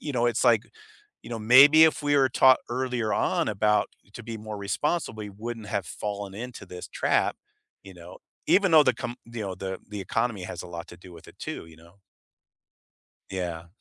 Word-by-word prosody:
you 150 - -5
know, 120 -1 +1
it's, 120 -1 0
like, 115 -3 +5 0.6
you - - -11
know, 115 - -4
maybe 135 +8 +8
if 155 -1 +2
we 145 0 +2
were 135 -2 +4
taught 130 +1 +5
earlier 125 -3 -1
on - - 0
about 105 0 +2 0.3
to 120 - -8
be 115 0 -6
more 110 0 -7
responsible, 110 +5 -2
we 105 - -6
wouldn't 110 +2 -7
have 100 -4 -2
fallen 100 -2 -5
into 125 +3 -8
this 90 0 -9
trap, - - 0 0.5
you 95 - -12
know, 90 +1 -12 0.3
even 190 -2 +4
though 155 -1 +8
the 130 - +3
com 120 +1 -5
you 115 -2 -6
know, 95 -2 -4
the 95 0 -5
the 105 -1 -6
economy 100 +1 -2
has 85 - -6
a - - -10
lot 85 -1 -8
to 90 - -12
do 90 0 -14
with 85 - -14
it - - -17
too, - - -6
you 80 -1 -16
know. 85 +4 -20 1.3
Yeah. 85 -3 -4
110 Hz, 205 wpm, -26 LUFS, 95-125 Hz, 1.3 s, maybe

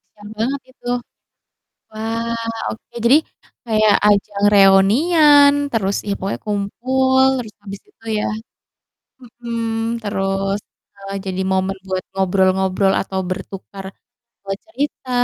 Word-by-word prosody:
kasihan 205 0 -12
banget 265 +5 -1
itu. 250 - -13 1.0
Wah 230 +1 -3
oke, 220 - -14 0.2
jadi 260 +5 +7 0.5
kayak 215 -2 +3
ajang 205 0 +2
reunian, 285 - +6 0.2
terus 200 -3 0
ya 200 - 0
pokoknya 195 +1 -4
kumpul, 260 +6 +1 0.2
terus 225 -4 -6
habis 200 -1 -8
itu 390 - -25
ya - - -1 1.2
mhm, 230 -1 -2
terus 195 0 -1 0.4
heeh, 195 0 -7
jadi 190 0 -2
momen 190 +1 0
buat 185 -1 -2
ngobrol-ngobrol 190 0 +2
atau 190 0 -4
bertukar, 195 +1 -7 0.6
eee, 195 - -1
cerita 290 -5 -4
205 Hz, 110 wpm, -19 LUFS, 195-235 Hz, 1.2 s, jadi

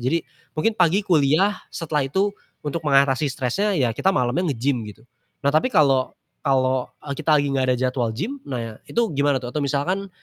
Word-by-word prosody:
Jadi, 130 +8 +1 0.4
mungkin 225 +9 +2
pagi 180 +2 +3
kuliah 170 +4 +3 0.2
setelah 150 -4 -1
itu 190 +10 +1 0.4
untuk 150 +3 -2
mengatasi 140 0 +3
stresnya 140 - -1
ya 125 -6 +2
kita 190 - 0
malamnya 135 +8 0
nge-gym 125 0 0
gitu. 105 +2 -13 0.4
Nah 140 - +3
tapi 155 +11 +3
kalau 135 - +2 0.3
kalau, 130 -2 +1 0.2
e 140 - -4
kita 155 +2 +2
lagi 145 -1 +1
nggak 135 -1 +1
ada - - 0
jadwal 125 -1 0
gym, 220 - -4
nah 115 -4 -5
itu 230 -6 0
gimana 140 -1 +2
tuh 120 -1 -7
atau 150 - -1
misalkan 150 +8 -1
140 Hz, 180 wpm, -23 LUFS, 130-170 Hz, 0.4 s, pagi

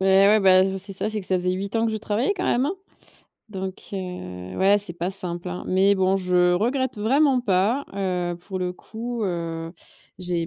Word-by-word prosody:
Ouais, 190 +1 +5
ouais 215 +1 +5
bah 185 -1 +6
je 190 0 -1
c'est 195 +1 -4
ça, 200 +3 0
c'est 215 -1 -2
que 190 - -5
ça 190 - +1
faisait 180 0 0
8 195 +3 -4
ans 225 0 +2
que - - 0
je - - -1
travaillais 220 - 0
quand 365 - -2
même, 255 +3 +2
hein. 320 - 0 0.8
Donc 190 -2 -5
heu, 95 - -6
ouais, 195 +2 +5
c'est 200 -3 -1
pas 175 +2 -3
simple, 180 -2 -2
hein. 180 0 -5
Mais 190 +2 +3
bon 190 0 +2
je 180 -1 +3
regrette 245 +6 0
vraiment 265 +4 +3
pas, 215 +5 +1
heu, 180 -3 -1
pour 185 +2 -6
le 180 -1 -2
coup, 230 +4 -6
heu, 165 -2 -3 0.5
j'ai 175 -2 -1
190 Hz, 210 wpm, -24 LUFS, 180-215 Hz, 0.8 s, bah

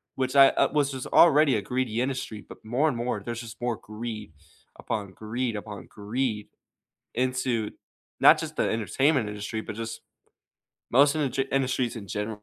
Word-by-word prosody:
Which 130 +1 -2
I, 135 -1 +9
uh, - - +1
was 145 -2 +1
just 130 -2 -5
already 150 -4 +6
a 105 - 0
greedy 120 +1 -1
industry, 125 -4 -3
but - - -14
more 125 +8 +1
and 145 - 0
more 120 -3 -2
there's 120 +1 -4
just 115 -2 -10
more 120 -1 0
greed, 110 -3 -7 0.4
upon 100 -3 -4
greed, 115 +3 -3
upon 105 -2 -7
greed, 105 +1 -3 0.7
into 125 -3 0 0.5
not - - +8
just - - -5
the - - +2
entertainment 115 +3 +1
industry, 105 +1 -4
but 110 - -7
just 115 0 -5 0.9
most 140 +4 +5
indu 135 -2 0
industries 130 -2 0
in 100 -3 -8
general. 105 0 -4
120 Hz, 165 wpm, -27 LUFS, 110-130 Hz, 0.9 s, I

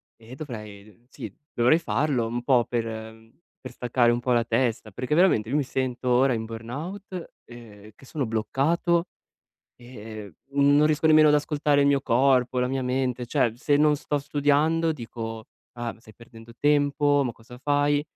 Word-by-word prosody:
e 115 +2 -13
dovrei, 105 - -10
sì, - - -9 0.2
dovrei 125 +7 +3
farlo 140 -8 0
un 120 +1 -4
po' 125 -2 +3
per 120 -2 -2
mhmm, 110 +4 -10 0.2
per 130 - -8
staccare 120 -1 +1
un 120 - 0
po' 125 +1 0
la 120 -1 +3
testa, 115 -2 -1
perché 130 +9 -2
veramente 165 - +3
io 135 - -1
mi 150 - +2
sento 130 -1 -3
ora 125 +2 +3
in 110 -1 -3
burnout, 160 - -7
ehm, 110 -3 -13
che - - -18
sono 140 0 -3
bloccato 155 +10 0 0.7
e, 125 +1 -14
ehm, 105 -4 -9 0.4
non 150 +1 +5
riesco 155 +1 +1
nemmeno 155 -1 +6
ad 150 - +5
ascoltare 150 -1 +1
il - - +2
mio 140 -1 +2
corpo, 130 0 +2
la 125 0 +1
mia 135 0 -2
mente. 125 -1 -2
Cioè, 120 -1 +1
se 145 +4 +1
non 150 0 +4
sto 145 0 -2
studiando 145 +3 +1
dico: 115 -4 -7 0.3
“Ah, 120 -1 -5
stai 110 -1 -17
perdendo 115 0 -15
tempo, 145 0 +2
ma 125 - -3
cosa 120 +2 -15
fai?” 145 +1 +1
125 Hz, 175 wpm, -25 LUFS, 115-145 Hz, 0.7 s, nemmeno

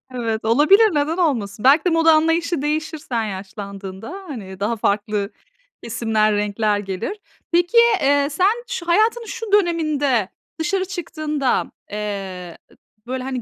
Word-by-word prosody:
Evet. 225 -3 -2
Olabilir, 335 - +5
neden 295 +3 0
olmasın? 225 - -1
Belki 290 +6 +6
de - - +4
moda 325 -1 +5
anlayışı 325 0 +1
değişir 310 +2 -2
sen 240 -6 -3
yaşlandığında, 195 0 -7 0.2
hani, 195 - -8
daha 210 +4 0
farklı 205 -1 -1 0.5
kesimler, 220 -2 +1
renkler 210 0 0
gelir. 195 - -5 0.3
Peki, 350 +6 +2 0.2
eee, 280 0 +3
sen, 400 +10 +1
şu 460 -8 -5
hayatının 440 +6 +2
şu 455 -1 -6
döneminde, 305 - +2 0.3
dışarı 375 +4 0
çıktığında, 310 -7 -2 0.2
eee, 195 -4 -5
ı - - -20 0.3
böyle, 255 0 -3
hani, 260 -1 -3
275 Hz, 135 wpm, -21 LUFS, 210-335 Hz, 0.5 s, Belki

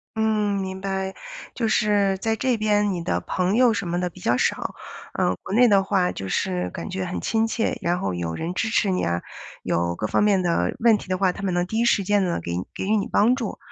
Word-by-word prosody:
嗯， 210 -2 +1
明 190 0 -5
白， 190 -1 -3 0.4
就 230 -3 0
是 205 -2 +2
在 220 +3 -1
这 250 +1 0
边 210 -1 +2
你 180 -2 -3
的 170 - -1
朋 185 +3 0
友 245 -2 +5
什 200 -4 -3
么 175 - -1
的 180 0 -1
比 185 - -15
较 120 -9 +1
少。 - - -1 0.4
呃， - - +1
国 - - -6
内 245 +2 +6
的 195 -2 +4
话， 190 -2 +1
就 95 - -6
是 90 -1 -1
感 85 - -6
觉 95 -1 -3
很 85 - -4
亲 225 0 +1
切， 225 0 -1
然 175 +1 0
后 95 - -2
有 85 -2 -3
人 170 - -3
支 220 - -1
持 220 -2 +1
你 185 - 0
啊， 85 0 -1 0.4
有 85 +1 0
各 105 - -2
方 - - +1
面 200 -3 +3
的 170 -1 0
问 230 -2 +5
题 - - -11
的 185 0 -1
话， 185 -1 +2
他 195 - -9
们 185 -2 0
能 175 0 +1
第 220 +4 -2
1 235 - +2
时 215 -4 +3
间 205 +1 +2 0.2
给 85 - -5 0.2
给 - - -4
予 215 +3 +2
你 200 - -1
帮 235 +5 +3
助 230 -6 -4
195 Hz, 260 characters per minute, -23 LUFS, 175-215 Hz, 0.4 s, 内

